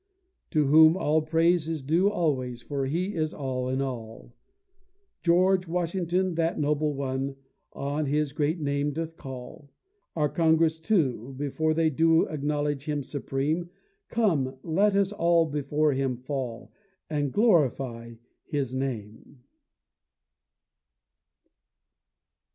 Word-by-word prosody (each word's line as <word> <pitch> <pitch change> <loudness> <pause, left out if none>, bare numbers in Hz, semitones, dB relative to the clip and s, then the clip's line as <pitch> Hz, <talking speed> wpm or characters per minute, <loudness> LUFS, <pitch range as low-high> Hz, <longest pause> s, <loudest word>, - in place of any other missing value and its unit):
To 155 -4 +2
whom 160 +4 +7
all 155 -2 +2
praise 165 +1 +2
is 160 -4 -3
due 170 +8 +3
always, 130 - -1
For 140 -2 -2
He 180 +8 -1
is 155 -1 -2
all 130 -2 -3
in 130 +1 0
all; 115 -3 -7 0.9
George 185 +1 +3
Washington, 180 +1 -1
that 165 0 0
noble 150 0 0
one, 135 0 -3 0.4
On 145 +2 -2
His 150 0 0
great 150 +4 -1
name 145 0 -1
doth 165 +1 -4
call. 130 +1 -9 0.5
Our 150 -2 +2
Congress 160 0 +2
too, 135 - 0
before 155 +3 0
they 160 -1 +2
do, 165 +3 +4
Acknowledge 145 -1 -2
Him 150 -2 -2
supreme; 145 +5 -2 0.4
Come 160 - 0
let 195 +5 +2
us 200 0 +2
all 170 -4 +3
before 150 0 0
Him 130 -2 -1
fall, 125 -2 -5 0.4
And 145 -3 -1
glorify 130 - +1 0.3
His 140 -5 -2
name. 120 -1 -5
150 Hz, 115 wpm, -27 LUFS, 135-165 Hz, 0.9 s, whom